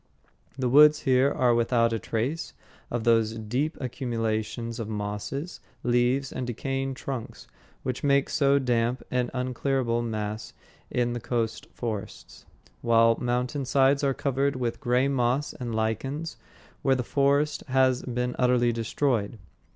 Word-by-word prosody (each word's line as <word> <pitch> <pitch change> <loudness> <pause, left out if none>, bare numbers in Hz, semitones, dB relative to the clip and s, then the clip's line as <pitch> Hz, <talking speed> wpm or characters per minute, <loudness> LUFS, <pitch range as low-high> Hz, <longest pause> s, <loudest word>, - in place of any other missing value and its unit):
The 130 -2 0
woods 150 +4 +7
here 130 0 +3
are 125 -4 +3
without 115 0 +2
a 115 - -1
trace 130 +11 -3 0.3
of 120 -1 -2
those 115 -1 +3
deep 125 +9 -2
accumulations 115 -2 -3
of 110 -2 -4
mosses, 105 - -4 0.2
leaves, 125 +3 +1
and 130 -1 -4
decaying 135 +2 -2
trunks 130 -3 -6 0.4
which 130 -1 -3
make 140 -1 +3
so 140 -2 +3
damp 120 -1 0
and 125 -1 0
unclearable 125 -1 -1
mass 110 -2 -4 0.4
in 120 -1 0
the 120 - -3
coast 115 -2 -2
forests. 110 -5 -6 0.4
Whole 115 -1 +5
mountain 125 +3 -1
sides 135 +2 +3
are 135 -1 +2
covered 140 0 0
with 120 -2 -2
gray 125 +2 +2
moss 135 +1 0
and 120 -3 -5
lichens 135 +9 -2 0.5
where 135 - +3
the 125 - -1
forest 140 +3 +1
has 130 -1 +3
been 125 0 -2
utterly 125 -1 +3
destroyed. 115 -1 -1
125 Hz, 135 wpm, -27 LUFS, 115-135 Hz, 0.5 s, woods